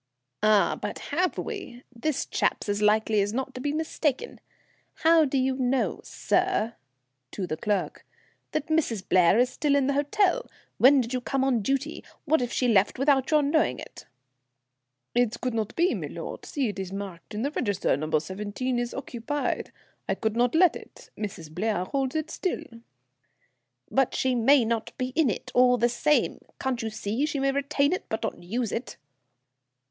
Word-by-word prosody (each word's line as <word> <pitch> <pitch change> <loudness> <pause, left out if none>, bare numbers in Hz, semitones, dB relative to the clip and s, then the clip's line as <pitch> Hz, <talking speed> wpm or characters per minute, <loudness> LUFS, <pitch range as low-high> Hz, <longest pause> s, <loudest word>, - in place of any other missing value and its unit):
"Ah! 215 -1 +3
but - - -4 0.2
have 360 +4 +1
we? 375 - -6
This 280 +4 -1
chap's - - -1
as 205 0 -1
likely 215 0 +3
as 205 +2 -1
not 265 +2 -3
to 255 - -7
be 290 - -1
mistaken. 310 - -2 0.6
How 325 -1 +6
do 275 0 -1
you 260 0 +1
know, 255 0 0
sir," 360 - 0 0.6
to 190 - -4
the 155 - -3
clerk, 205 +3 -2 0.5
"that 310 - -1
Mrs. 280 -12 0
Blair 180 +2 +5
is 250 +1 +3
still 290 0 +1
in 280 -2 +3
the 280 - +1
hotel? 375 - +1 0.3
When 270 +2 +7
did 240 +1 -5
you 255 - -1
come 270 +2 -1
on 255 -4 +2
duty? 275 +7 -2 0.2
What 315 -2 +3
if 245 -1 -2
she 250 - +1
left 205 -4 +3
without 270 0 +2
your 305 -1 +4
knowing 285 - +2
it?" - - -11 1.1
"It 240 -1 +1
could 250 -1 -2
not 220 -2 -2
be, 345 +2 +3
milord. - - -6
See, 275 -4 -1
it 200 -1 -6
is 190 -1 -5
marked 195 -1 -7
in 215 - -2
the 285 - -1
register. 205 - 0
No. 155 +2 0
17 205 +9 -3
is 240 -1 -3
occupied. 270 +2 -3 0.4
I - - +2
could 220 -1 -2
not 245 +4 +2
let 350 0 +5
it. - - -12
Mrs. 180 -7 -6
Blair 190 0 -1
holds 270 +5 -2
it 315 0 -2
still." 365 -3 -2 1.3
"But 270 -2 +2
she 260 -1 +1
may 250 +2 +5
not 230 -1 -2
be 255 0 -2
in 290 0 +2
it, 205 - -4
all 250 0 +5
the 240 0 +3
same. 300 +5 +1 0.2
Can't 260 -3 -1
you 225 - -2
see? 220 +6 -2
She 305 - -2
may 275 0 +2
retain 280 +2 +1
it, 370 - -3
but 220 - -3
not - - -3
use 225 +6 -2
it." 240 +2 -5
250 Hz, 180 wpm, -27 LUFS, 215-285 Hz, 1.3 s, When